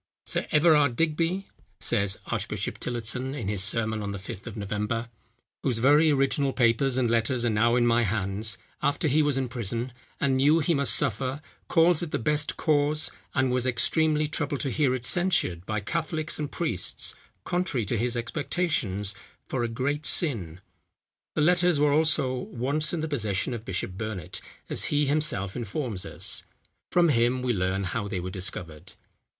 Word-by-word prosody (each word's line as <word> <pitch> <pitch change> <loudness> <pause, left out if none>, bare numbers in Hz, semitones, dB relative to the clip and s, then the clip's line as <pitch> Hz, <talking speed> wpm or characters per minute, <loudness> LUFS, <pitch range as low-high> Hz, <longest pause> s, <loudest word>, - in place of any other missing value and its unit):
"Sir - - -2
Everard 150 -4 +4
Digby," 165 +5 0 0.3
says 100 -1 +1
Archbishop - - -3
Tillotson 125 +3 -1
in 115 -9 -4
his 100 -2 0
sermon 110 +1 0
on 100 - -4
the 100 - -4
fifth 100 +3 -9
of 115 -1 -7
November, 105 +3 -3 0.5
"whose 125 -4 +1
very 145 +6 +5
original 135 -1 +1
papers 125 +2 +2
and 125 -2 +2
letters 115 +2 +1
are 120 - +2
now 115 +3 +3
in 120 -1 +3
my 120 0 +3
hands, 105 +1 0 0.2
after 145 +2 +1
he 150 +2 +3
was 145 -3 +1
in 130 -1 0
prison, 120 0 -2 0.3
and 135 -2 +2
knew 145 +4 +4
he 165 +1 +1
must 140 -2 +4
suffer, 130 +1 0 0.3
calls 165 0 +4
it 170 - -3
the - - -1
best 150 +5 0
cause, 150 0 +1 0.2
and 130 -2 +2
was 125 0 +1
extremely 155 +4 +1
troubled 145 -2 -2
to 135 - -2
hear 135 -2 +2
it 125 -1 -3
censured 160 - +1
by 110 0 -1
Catholics 160 +7 -2
and 150 -1 -3
priests, 115 - -1 0.3
contrary 165 - -1
to 100 - -1
his 120 +2 -1
expectations, 120 - 0 0.3
for 125 -3 -2
a - - 0
great 140 +6 -1
sin." 95 - +1 0.7
The - - +1
letters 175 0 +3
were 145 -1 +3
also, 155 -4 +3
once 130 +4 -1
in 170 - -2
the 160 - -2
possession 110 -5 -1
of 115 -1 -6
Bishop 95 0 -3
Burnet, 110 -6 -5 0.3
as - - -1
he 145 0 +1
himself 140 -10 0
informs 115 - -3
us. - - -1 0.5
From 175 -1 +4
him 125 -1 +2
we 125 -1 +1
learn 95 0 -1
how 100 +3 -3
they 100 -2 -3
were 90 +1 -5
discovered. 90 -4 -3
125 Hz, 170 wpm, -27 LUFS, 110-150 Hz, 0.7 s, very